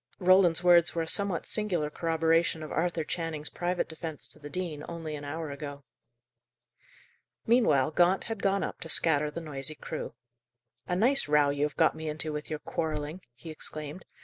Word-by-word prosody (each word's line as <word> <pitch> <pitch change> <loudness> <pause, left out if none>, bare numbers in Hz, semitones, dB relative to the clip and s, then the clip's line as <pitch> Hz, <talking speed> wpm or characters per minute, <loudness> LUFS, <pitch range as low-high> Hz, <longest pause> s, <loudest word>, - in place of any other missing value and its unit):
Roland's 180 -2 +4
words 175 -2 +5
were 165 - +1
a - - -6
somewhat 195 -1 0
singular 180 -9 0
corroboration 165 0 +1
of 155 - -7
Arthur 165 0 0
Channing's 155 -2 -4
private 175 0 -1
defence 160 -7 -6
to 120 +6 -12
the 145 -1 -9
dean 155 -2 -4
only 165 -2 -5
an 145 - -7
hour 155 +1 -4
ago. 145 0 -7 1.6
Meanwhile 155 - +4
Gaunt 180 +4 +3
had 225 -3 -5
gone 195 0 +2
up - - -4
to 165 - -7
scatter 150 -2 +3
the 165 +3 -6
noisy 150 -1 -3
crew. 155 -5 -6 0.7
"A 180 - 0
nice 250 - +4
row 150 -1 +4
you 145 +1 +1
have 150 - -5
got 160 - +4
me 160 0 -5
into 155 0 -3
with 150 0 -5
your 155 - -2
quarrelling," 155 +2 -3
he 160 +6 -9
exclaimed. 155 +2 -7
160 Hz, 175 wpm, -29 LUFS, 150-175 Hz, 1.6 s, words